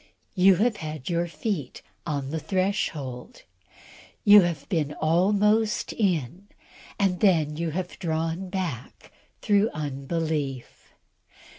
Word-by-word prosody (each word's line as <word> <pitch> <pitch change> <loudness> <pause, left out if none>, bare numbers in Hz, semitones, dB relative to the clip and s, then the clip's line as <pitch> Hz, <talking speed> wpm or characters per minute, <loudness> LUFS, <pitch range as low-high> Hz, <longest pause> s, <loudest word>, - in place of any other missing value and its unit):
You 190 0 +5
have 215 +3 +1
had 155 -4 -6
your 170 0 0
feet 160 - -4 0.2
on 140 -3 -3
the 160 - -2
threshhold! 160 - -3 0.8
You 205 0 +9
have 170 -5 -2
been 150 -6 -1
almost 210 +6 +2
in, 180 - -1 0.5
and 190 -3 +1
then 160 -7 +3
you 165 +1 -2
have 175 +3 -5
drawn 165 +1 -2
back 175 - -5 0.3
through 205 +1 +3
unbelief. 145 -2 -4
170 Hz, 110 wpm, -26 LUFS, 150-195 Hz, 0.8 s, You